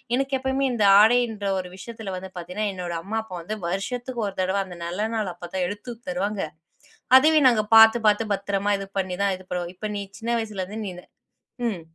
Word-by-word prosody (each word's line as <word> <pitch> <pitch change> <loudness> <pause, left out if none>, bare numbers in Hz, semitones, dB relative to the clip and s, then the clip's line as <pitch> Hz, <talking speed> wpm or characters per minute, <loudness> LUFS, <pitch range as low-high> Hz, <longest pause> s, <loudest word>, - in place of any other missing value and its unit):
எனக்கு 270 +1 0
எப்பவுமே 265 +1 0
இந்த 215 -3 +1 0.2
ஆடையின்ற 225 -2 +3
ஒரு 180 - -5
விஷயத்துல 220 -2 -7
வந்து 190 +1 -7
பாத்தீங்கன்னா, 180 +5 -3
என்னோட 175 -2 -5
அம்மா, 220 +3 -3
அப்பா 185 -5 -9
வந்து 215 +6 -4
வருஷத்துக்கு 240 +6 -3
ஒரு 195 - -6
தடவை. 190 +2 0
அந்த 180 -2 -10
நல்ல 195 +6 -2
நாள் 210 -5 -1
அப்போ 175 - -9
தான் 180 -1 +1
எடுத்து 205 +5 -6 0.2
தருவாங்க. 195 +3 -2 0.7
அதையும் 305 -1 +5
நாங்க 215 -3 +1
பாத்து, 225 +1 +8
பாத்து 210 +2 +3
பத்தரமா 200 +1 0
இது 195 - -6
பண்ணி 180 -1 -2
தான் 195 -2 +1
இது 185 - -16
பண்ணுவோம். 175 0 -3
இப்ப 215 +3 -5
நீ 200 - -3 0.2
சின்ன 230 +1 -4
வயசிலருந்து 210 -1 -4
நீனு 180 -1 -8 0.6
ம். 190 -6 -4
205 Hz, 190 wpm, -24 LUFS, 185-225 Hz, 0.7 s, பாத்து